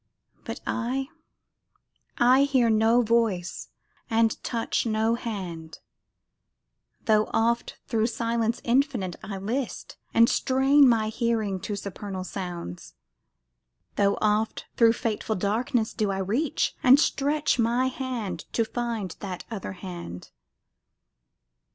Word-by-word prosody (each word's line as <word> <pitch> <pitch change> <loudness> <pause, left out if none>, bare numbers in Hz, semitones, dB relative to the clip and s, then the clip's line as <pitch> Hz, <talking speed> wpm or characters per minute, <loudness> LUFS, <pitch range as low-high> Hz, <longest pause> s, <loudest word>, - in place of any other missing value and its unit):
But - - -6
I 260 +3 -2 1.1
I 255 +3 +5
hear 255 -5 +3
no 225 +3 +4
voice 220 -6 0 0.4
and 225 0 +1
touch 230 -2 -1
no 220 +1 +1
hand, 185 -9 -5 1.3
Tho' 215 -2 +3
oft 235 +1 0
thro' 225 -1 +1
silence 230 -1 -1
infinite 240 - +1
I 205 -3 -5
list, 230 +6 -4
And 230 0 +5
strain 270 +2 +4
my 220 -2 +2
hearing 220 -4 -1
to 205 - -4
supernal 200 -1 -6
sounds; 175 - -6 1.0
Tho' 200 0 +2
oft 215 +1 +1
thro' 230 -1 +6
fateful 220 -1 -2
darkness 220 +4 0
do 215 -2 0
I 195 - -1
reach, 225 +11 0
And 260 +2 +7
stretch 295 -2 +1
my 235 +3 +2
hand 255 -6 -4
to 230 - +2
find 230 -6 -3
that 185 -3 -6
other 200 -4 -5
hand. 175 - -8
225 Hz, 115 wpm, -26 LUFS, 200-240 Hz, 1.3 s, And